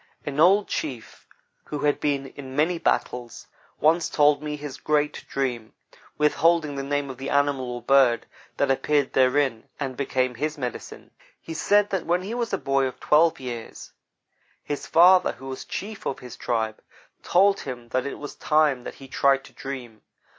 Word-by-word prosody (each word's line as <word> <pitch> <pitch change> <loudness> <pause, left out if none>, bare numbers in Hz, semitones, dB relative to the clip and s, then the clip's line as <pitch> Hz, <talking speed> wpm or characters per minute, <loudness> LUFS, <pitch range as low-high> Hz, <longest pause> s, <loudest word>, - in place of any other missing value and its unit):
An 145 0 -4
old 195 +5 +5
chief, 125 -7 -5 0.4
who 150 - -5
had 145 -1 +1
been 140 -2 0
in 135 -1 -10
many 165 +4 +1
battles, 125 -6 -2 0.3
once 160 +2 +3
told 145 -1 +3
me 150 -1 -4
his 145 -2 -7
great 150 -1 0
dream, 120 -5 -3 0.4
withholding 155 0 +2
the 140 - -3
name 140 0 -2
of 130 - -12
the 135 - -4
animal 140 -3 +1
or 120 -1 -6
bird 135 -4 +4 0.3
that 140 -1 +2
appeared 145 +1 +1
therein 130 -3 +2
and 135 -3 -3
became 130 -1 0
his 150 +5 -3
"medicine." 125 -4 -6 0.3
He 165 - -8
said 205 +5 +2
that 190 -2 -2
when 175 +2 +1
he 205 +4 -5
was 235 -2 -2
a - - +1
boy 135 0 +1
of 130 - -8
twelve 160 +2 +3
years, 120 -3 -7 0.7
his 145 - -5
father, 180 +2 +6
who 135 - -11
was 130 - -6
chief 210 +1 -6
of 135 - -2
his 125 -2 -10
tribe, 110 -2 -2 0.4
told 195 +2 +3
him 120 -3 -7
that 130 +3 -1
it - - -5
was 145 - -7
time 150 -5 +1
that - - -7
he 135 - -12
tried 135 +1 +2
to - - -16
dream. 125 -5 -7
140 Hz, 175 wpm, -25 LUFS, 130-155 Hz, 0.7 s, father